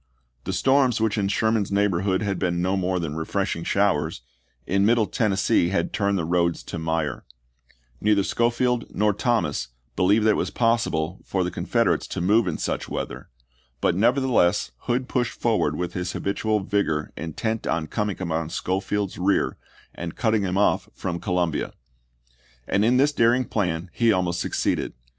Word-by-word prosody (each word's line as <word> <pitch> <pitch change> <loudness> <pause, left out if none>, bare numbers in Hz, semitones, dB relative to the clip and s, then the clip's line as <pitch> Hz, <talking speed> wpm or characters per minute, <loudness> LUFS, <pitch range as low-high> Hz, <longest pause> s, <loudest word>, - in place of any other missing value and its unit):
The - - -2
storms 130 -3 +3
which 110 -2 +1
in 100 -3 0
Sherman's 110 0 +1
neighborhood 100 -1 +1
had 100 -3 -1
been 85 -2 0
no 95 +2 +1
more 95 -1 0
than 80 -4 -3
refreshing 80 +1 -2
showers, 100 -7 +1 0.4
in 100 +1 +1
Middle 115 +1 +4
Tennessee 100 -3 +1
had 85 -3 -1
turned 100 -1 +1
the 85 - -1
roads 85 0 +1
to 85 - -6
mire; 80 -4 -2 0.8
neither 105 -1 +3
Schofield 120 +2 +1
nor 105 +1 +2
Thomas 115 - 0 0.3
believed 105 +4 +3
that 110 - +6
it - - +1
was - - -1
possible 95 -8 0
for 95 -1 -1
the 90 - -2
Confederates - - 0
to - - -4
move 105 +5 +3
in 85 - -1
such - - -3
weather, 65 +1 -5 0.5
but - - +2
nevertheless 120 -3 +2 0.2
Hood 125 +1 0
pushed 125 -2 -2
forward 110 -10 +1
with 90 +2 -3
his 90 0 -3
habitual 105 +1 -1
vigor 95 -6 -1
intent 110 +7 -3
on 80 -1 0
coming 105 +4 -2
upon 80 -3 -2
Schofield's 95 +2 -2
rear 95 +2 +1 0.4
and 85 -1 -6
cutting 110 -3 +1
him 95 -1 -1
off 100 - +2
from 85 -2 -3
Columbia; 90 -4 -1 0.9
and 100 - +2
in 120 +3 +4
this 145 +3 +3
daring 120 0 +3
plan 90 -5 -2
he 115 -1 +3
almost 90 -3 0
succeeded. - - -1
100 Hz, 160 wpm, -24 LUFS, 85-110 Hz, 0.9 s, that